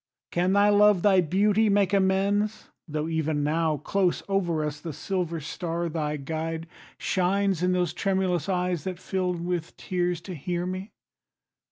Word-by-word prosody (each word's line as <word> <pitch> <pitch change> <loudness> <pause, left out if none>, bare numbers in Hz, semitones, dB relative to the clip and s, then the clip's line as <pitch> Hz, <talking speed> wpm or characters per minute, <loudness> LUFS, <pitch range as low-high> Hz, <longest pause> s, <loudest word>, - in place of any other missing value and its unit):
Can 180 +2 +1
thy 200 +1 +5
love, 205 -3 +5
Thy 195 -3 +5
beauty, 205 +6 +2
make 200 -1 +2
amends, 200 +2 +1 0.2
tho' 155 0 -2
even 160 -2 0
now, 155 +1 +1
Close 185 +4 0
over 175 -6 0
us, 150 -1 -4
the 160 -1 -5
silver 170 +1 -2
star, 170 +2 -3
thy 150 -2 -2
guide, 160 +3 -4 0.3
Shines 190 -1 +1
in 180 0 +2
those 180 -3 0
tremulous 190 -2 0
eyes 180 -3 0
that 185 -2 -4
fill 185 0 -1
with 170 -1 -3
tears 180 -2 -1
To 180 +2 -7
hear 175 +3 -3
me? 185 +3 -5
180 Hz, 155 wpm, -26 LUFS, 165-195 Hz, 0.3 s, thy